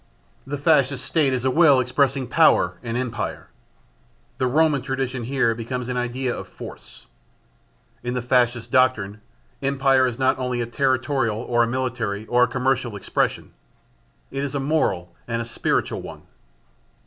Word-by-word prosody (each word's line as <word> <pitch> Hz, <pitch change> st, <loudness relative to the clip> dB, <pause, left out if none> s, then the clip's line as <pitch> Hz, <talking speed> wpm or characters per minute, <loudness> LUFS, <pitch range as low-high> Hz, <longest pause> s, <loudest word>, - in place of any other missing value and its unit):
The 145 Hz, +1 st, -3 dB
Fascist 140 Hz, -3 st, +2 dB
State 150 Hz, -5 st, +2 dB
is 130 Hz, -1 st, -2 dB
a 130 Hz, -, +3 dB
will 145 Hz, -2 st, +6 dB
expressing 135 Hz, +1 st, +1 dB
power -, -, +3 dB
and 115 Hz, 0 st, -3 dB
empire. 120 Hz, -3 st, -4 dB, 0.9 s
The 130 Hz, -, +2 dB
Roman 150 Hz, +1 st, +3 dB
tradition 130 Hz, -2 st, -3 dB
here 130 Hz, -2 st, +1 dB
becomes 120 Hz, +2 st, -5 dB
an 125 Hz, -, -2 dB
idea 125 Hz, +1 st, -2 dB
of -, -, -7 dB
force. -, -, -12 dB, 1.0 s
In 125 Hz, +1 st, -3 dB
the 125 Hz, -, -2 dB
Fascist 120 Hz, -2 st, +1 dB
doctrine, 105 Hz, -5 st, +2 dB, 0.4 s
empire 135 Hz, -1 st, +3 dB
is 120 Hz, -2 st, -4 dB
not 130 Hz, 0 st, +2 dB
only 125 Hz, -1 st, -2 dB
a 120 Hz, -, 0 dB
territorial 130 Hz, -2 st, 0 dB
or 120 Hz, +1 st, 0 dB
a 115 Hz, -, +3 dB
military, 115 Hz, -4 st, -2 dB
or 120 Hz, +2 st, +2 dB
a 125 Hz, -, +6 dB
commercial 130 Hz, -3 st, -1 dB
expression: 100 Hz, -, -1 dB, 0.8 s
it 135 Hz, +1 st, -3 dB
is 140 Hz, 0 st, -4 dB
a -, -, 0 dB
moral 135 Hz, -, 0 dB
and 115 Hz, -1 st, -2 dB
a 115 Hz, -, -3 dB
spiritual 115 Hz, -, -1 dB
one. -, -, -10 dB
125 Hz, 155 wpm, -23 LUFS, 120-135 Hz, 1.0 s, will